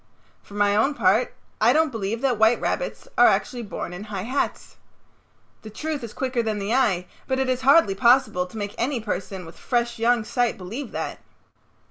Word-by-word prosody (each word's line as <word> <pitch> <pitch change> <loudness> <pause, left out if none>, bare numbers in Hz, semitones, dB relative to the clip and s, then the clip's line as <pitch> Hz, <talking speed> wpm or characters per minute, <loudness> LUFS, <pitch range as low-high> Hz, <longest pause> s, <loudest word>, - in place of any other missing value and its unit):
For 205 - -14
my 205 0 +2
own 270 +8 +2
part 215 +2 +2 0.3
I 230 +3 +5
don't 315 0 +2
believe 225 0 -3
that 255 -5 +1
white 220 +2 +4
rabbits - - -3
are - - +8
actually 245 -3 0
born 200 -5 -6
in 185 +4 -7
high 200 -3 -5
hats. 260 +6 -3 0.8
The 215 - -9
truth 300 +5 -4
is 230 - -6
quicker 255 -1 -1
than 220 -2 -2
the 205 +2 -2
eye, 205 -9 +2 0.2
but 260 - 0
it 265 0 0
is 255 0 0
hardly 275 -6 +5
possible 235 -4 +3
to 200 - -11
make 205 -1 -4
any 255 +1 0
person 195 -3 -5
with 165 - -13
fresh 240 -1 -1
young 235 0 +2
sight 240 +1 0
believe 225 +8 -6
that. - - -5
230 Hz, 190 wpm, -24 LUFS, 205-255 Hz, 0.8 s, are